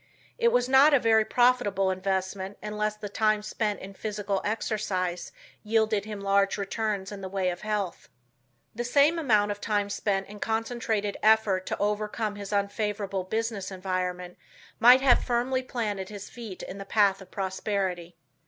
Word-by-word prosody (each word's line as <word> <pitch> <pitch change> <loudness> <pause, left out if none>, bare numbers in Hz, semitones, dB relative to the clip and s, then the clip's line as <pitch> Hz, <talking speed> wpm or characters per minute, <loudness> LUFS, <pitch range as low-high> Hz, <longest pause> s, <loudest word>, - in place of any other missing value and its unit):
It 470 - +4
was 245 0 +2
not 275 +3 +6
a - - +5
very 220 -2 +4
profitable 220 -6 +2
investment 190 +1 -2
unless 210 0 -2
the 210 0 -7
time 215 +1 +1
spent 210 -1 -2
in 195 +1 -9
physical 205 -1 -3
exercise 200 -5 -2 0.3
yielded 215 -1 +1
him 210 -2 -6
large 200 0 +2
returns 205 -1 -2
in 200 -1 -7
the 190 - -5
way 185 -1 0
of 175 - -7
health. 210 -4 -3 0.6
The 240 - -3
same 285 +7 +3
amount 210 -8 +3
of 205 0 -6
time 205 -1 0
spent 195 -1 -1
in 210 +1 -11
concentrated 225 -2 -1
effort 215 -4 +3
to - - -2
overcome 210 +1 -1
his 200 -1 -7
unfavorable 200 -1 -1
business 220 -1 -2
environment 180 -1 -4 0.4
might 245 +3 +8
have 265 -2 +4
firmly 250 +2 0
planted 210 -6 -3
his 205 -1 -9
feet 225 -6 -8
in 195 - -7
the - - -5
path 200 -2 +2
of 190 - -13
prosperity. 190 -3 -3
205 Hz, 160 wpm, -27 LUFS, 195-220 Hz, 0.6 s, might